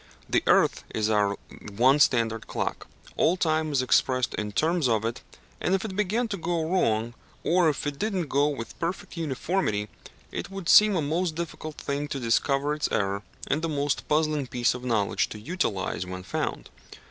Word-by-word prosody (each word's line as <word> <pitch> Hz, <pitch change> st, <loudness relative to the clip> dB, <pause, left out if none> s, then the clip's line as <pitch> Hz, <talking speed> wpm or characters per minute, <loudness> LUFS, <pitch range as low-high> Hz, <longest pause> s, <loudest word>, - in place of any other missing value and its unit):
The -, -, +2 dB
earth -, -, +4 dB
is 110 Hz, 0 st, +1 dB
our 100 Hz, -1 st, +2 dB, 0.4 s
one 130 Hz, +5 st, +5 dB
standard 115 Hz, -6 st, +2 dB
clock: -, -, -3 dB, 0.3 s
all 175 Hz, +3 st, +3 dB
time 155 Hz, -2 st, +1 dB
is 135 Hz, -3 st, +2 dB
expressed 130 Hz, 0 st, +2 dB
in 105 Hz, 0 st, -3 dB
terms 160 Hz, -, +1 dB
of 110 Hz, -1 st, +1 dB
it, 115 Hz, +1 st, -3 dB, 0.4 s
and 185 Hz, -, +2 dB
if 195 Hz, -, -2 dB
it 195 Hz, -3 st, -5 dB
began 210 Hz, +4 st, 0 dB
to 200 Hz, -, -2 dB
go 165 Hz, -1 st, -1 dB
wrong, 115 Hz, -10 st, +1 dB, 0.3 s
or 175 Hz, -1 st, +4 dB
if 150 Hz, -, -3 dB
it 145 Hz, -1 st, -3 dB
did 215 Hz, -1 st, -1 dB
not 175 Hz, -4 st, -1 dB
go 140 Hz, +2 st, +2 dB
with 135 Hz, -6 st, -5 dB
perfect 180 Hz, +3 st, -4 dB
uniformity, 145 Hz, -, -1 dB, 0.4 s
it -, -, -5 dB
would 195 Hz, -3 st, -7 dB
seem 210 Hz, -1 st, +7 dB
a 165 Hz, -, +1 dB
most 165 Hz, +3 st, -1 dB
difficult 155 Hz, -2 st, -5 dB
thing 140 Hz, +1 st, -3 dB
to 140 Hz, -2 st, -4 dB
discover 135 Hz, +4 st, +1 dB
its 150 Hz, -, -1 dB
error, 100 Hz, -1 st, 0 dB, 0.2 s
and 155 Hz, +3 st, -1 dB
a -, -, +1 dB
most 145 Hz, -1 st, -1 dB
puzzling 150 Hz, -2 st, +1 dB
piece 120 Hz, -1 st, +1 dB
of 125 Hz, 0 st, -7 dB
knowledge 110 Hz, -5 st, +1 dB
to 105 Hz, -, -8 dB
utilize 105 Hz, -, -2 dB
when 90 Hz, 0 st, -7 dB
found. -, -, -3 dB
145 Hz, 185 wpm, -27 LUFS, 115-170 Hz, 0.4 s, seem